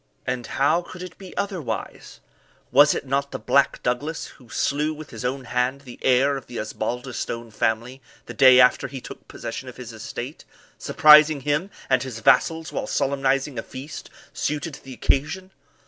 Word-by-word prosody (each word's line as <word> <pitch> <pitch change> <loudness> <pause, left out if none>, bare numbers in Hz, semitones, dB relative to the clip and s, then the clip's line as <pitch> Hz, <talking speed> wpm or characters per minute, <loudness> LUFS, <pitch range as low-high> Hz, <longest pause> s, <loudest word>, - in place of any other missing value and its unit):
And 125 -1 -3
how 145 +6 +2
could 180 +1 -10
it 180 -1 -9
be 190 -2 -11
otherwise? 170 - -4 0.5
Was 145 +3 +6
it - - -4
not 140 +1 0
the - - -5
Black 140 - +2
Douglas 145 +6 -2
who 125 -3 -16
slew 150 +5 0
with 155 0 -10
his - - -7
own 130 +2 -2
hand 125 +2 -1
the 125 -3 -12
heir 135 +2 +3
of 135 - -10
the 120 - -8
Osbaldistone 115 +1 -4
family 115 +5 -1 0.2
the - - -8
day 130 -2 +7
after 125 0 +5
he 135 +1 -7
took - - -11
possession 115 +3 -6
of 125 - -12
his 120 -2 -8
estate, 120 +5 -7 0.4
surprising 150 -1 +6
him 150 +7 0 0.2
and 130 -1 +3
his 130 -3 -5
vassals 160 +8 +3
while 270 - -3
solemnizing 135 - 0
a - - -2
feast 140 +4 -9 0.2
suited 150 +1 -2
to - - -11
the 130 -1 -9
occasion? 160 +10 -1
135 Hz, 175 wpm, -24 LUFS, 125-150 Hz, 0.5 s, day